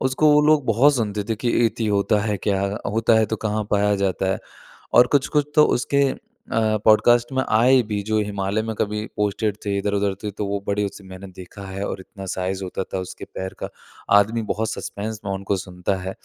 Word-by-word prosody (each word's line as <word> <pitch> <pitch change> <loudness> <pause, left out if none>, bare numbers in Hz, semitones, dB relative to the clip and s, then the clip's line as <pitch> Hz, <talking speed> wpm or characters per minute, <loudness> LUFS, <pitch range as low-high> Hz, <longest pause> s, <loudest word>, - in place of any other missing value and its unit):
उसको 130 +4 +2
वो 150 - +6
लोग 155 -2 +4
बहुत 130 +6 +4
सुनते 105 -3 -2
थे - - +2
कि 120 +2 -2 0.2
यति 115 0 -2
होता 105 +1 +2
है 105 -1 -1
क्या? 100 0 0 0.3
होता 115 +1 +3
है 110 - +3
तो 110 +1 -2
कहाँ 105 0 -1
पाया 105 0 +2
जाता 95 0 0
है? - - -3 0.6
और 125 +1 +7
कुछ-कुछ 145 +1 0
तो 150 - +7
उसके 140 +3 +1
अ, 110 -1 -2
पॉडकास्ट 120 +3 +4
में 130 - +1
आए 125 +4 +5
भी 105 -1 -1
जो 110 0 +1
हिमालय 100 0 -1
में 110 0 -4
कभी 105 +1 -1
पोस्टेड 105 0 -1
थे 100 -1 0
इधर-उधर 100 -1 0
थे 105 - -3
तो 105 +1 -4
वो 100 0 -2
बड़े 100 0 0
उससे 100 0 -8
मैंने 95 +1 -9
देखा 95 +2 -10
है 95 +1 -5
और - - -5
इतना 95 +1 -10
साइज़ 95 +1 -3
होता 95 +1 -4
था 95 - -1
उसके - - -9
पैर 95 0 -5
का - - -5 0.5
आदमी 110 +3 0
बहुत 110 0 -2
सस्पेंस 110 +1 -5
में 100 - -2
उनको 95 0 -2
सुनता 90 +1 -3
है। 95 +1 -4
105 Hz, 210 wpm, -22 LUFS, 100-115 Hz, 0.6 s, और